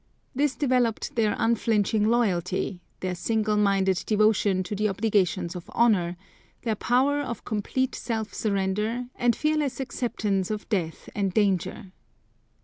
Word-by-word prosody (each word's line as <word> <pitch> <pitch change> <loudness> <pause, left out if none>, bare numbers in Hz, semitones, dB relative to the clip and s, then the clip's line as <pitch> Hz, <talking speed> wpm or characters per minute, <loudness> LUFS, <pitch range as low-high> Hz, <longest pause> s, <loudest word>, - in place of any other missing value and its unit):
This 285 +1 +1
developed 250 -6 +1
their 220 -3 +2
unflinching 220 -2 +2
loyalty, 190 -5 0 0.2
their 185 -1 -1
single 215 +4 0
minded 195 -3 +2
devotion 210 -3 +3
to 185 +3 -4
the 215 +1 +1
obligations 190 -3 0
of 175 - -8
honour, 185 -7 +2 0.5
their 225 - 0
power 260 +7 +2
of 235 -6 -5
complete 245 +4 -1
self 220 -2 -3
surrender 210 +4 -1
and 240 -2 +2
fearless 300 -4 0
acceptance 215 -7 -1
of 215 -1 -4
death 175 -7 -2
and 195 -3 -1
danger. 195 -2 0
215 Hz, 130 wpm, -26 LUFS, 190-235 Hz, 0.5 s, devotion